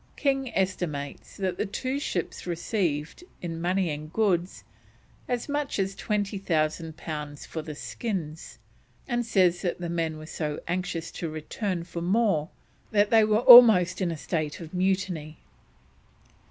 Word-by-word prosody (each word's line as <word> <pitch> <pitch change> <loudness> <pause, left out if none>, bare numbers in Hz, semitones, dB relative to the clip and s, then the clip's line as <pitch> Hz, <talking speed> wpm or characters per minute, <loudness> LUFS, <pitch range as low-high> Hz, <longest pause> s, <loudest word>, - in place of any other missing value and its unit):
King 270 -3 0
estimates 170 -7 -3
that 185 -3 -2
the - - +1
two 260 +7 -2
ships 180 - -3
received, 170 - -2 0.2
in 165 -2 -5
money 180 0 +1
and 150 +1 -6
goods, 185 -4 0 0.6
as 245 -1 -2
much 290 -1 -2
as 195 -1 0
2000 185 -7 -1
pounds 150 -2 -6
for 160 - -5
the 155 -1 -7
skins, 165 -4 -5 0.5
and 240 -1 0
says 185 -6 +2
that 175 -2 -2
the 175 -1 -4
men 165 -2 -1
were 155 - -9
so 150 -2 -4
anxious 170 -2 -3
to 165 - -4
return 170 +4 -3
for 170 0 -6
more 185 -4 +1 0.4
that 205 -1 +2
they 225 -1 +6
were 215 +1 +3
almost 225 -8 +9
in 180 - +1
a 165 - -3
state 155 -1 -3
of 165 -1 -9
mutiny. 180 -4 -1
180 Hz, 145 wpm, -27 LUFS, 160-205 Hz, 0.6 s, almost